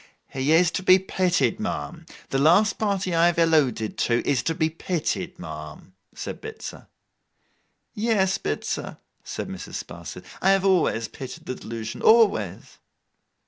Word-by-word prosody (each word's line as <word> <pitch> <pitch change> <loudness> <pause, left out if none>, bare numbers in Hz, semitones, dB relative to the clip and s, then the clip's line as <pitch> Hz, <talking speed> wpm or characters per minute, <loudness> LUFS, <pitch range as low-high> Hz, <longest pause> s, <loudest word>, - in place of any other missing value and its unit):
'He 135 +3 -1
is 170 +2 +5
to - - -2
be 185 0 +7
pitied, 185 0 0
ma'am. 170 -6 -4 0.2
The 135 - 0
last 175 +9 +4
party 200 -4 0
I 165 +1 +5
have 175 - +1
alluded 150 -10 +2
to, 120 -1 +1
is 135 -5 +2
to 165 - -1
be 160 - +2
pitied, 165 +1 -3
ma'am,' - - -9 0.2
said - - -6
Bitzer. 445 0 -8 1.1
'Yes, 205 -4 +1
Bitzer,' - - -3 0.3
said - - -5
Mrs. - - -7
Sparsit. - - -9 0.2
'I 190 - +3
have 195 0 +3
always 170 -12 +2
pitied 130 +2 -9
the - - -3
delusion, 115 -2 -6
always. 200 - +3
170 Hz, 145 wpm, -24 LUFS, 135-195 Hz, 1.1 s, be